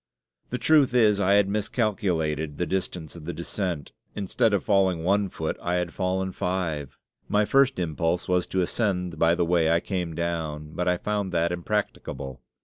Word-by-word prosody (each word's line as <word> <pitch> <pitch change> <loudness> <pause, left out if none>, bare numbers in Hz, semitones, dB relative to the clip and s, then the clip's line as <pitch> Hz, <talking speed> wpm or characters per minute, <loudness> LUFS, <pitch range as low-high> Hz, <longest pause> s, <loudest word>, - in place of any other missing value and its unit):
The 125 - -2
truth 145 -3 +4
is, 105 -4 +5
I 100 0 +3
had 100 -1 +5
miscalculated 95 - -1
the 90 - 0
distance 90 -3 -3
of 80 -3 -10
the 85 - -3
descent 85 -3 -4 0.2
instead 105 +3 +1
of 100 -3 +1
falling 95 -5 +2
one 100 +2 +2
foot, 80 -2 -3
I 90 +1 -1
had 90 -2 -1
fallen 95 0 -1
five. 85 -7 -3 0.3
My 105 0 +3
first 135 +2 +3
impulse 85 +1 -1
was 90 -1 +1
to 95 - 0
ascend 90 -5 -1
by 85 +1 +4
the 85 - +1
way 85 -1 +3
I 85 +1 +4
came 90 -3 -3
down, 80 -3 -3
but 90 +2 -2
I 90 0 +3
found 105 -1 -2
that 85 0 +2
impracticable. 85 -8 -3
90 Hz, 175 wpm, -26 LUFS, 85-100 Hz, 0.3 s, is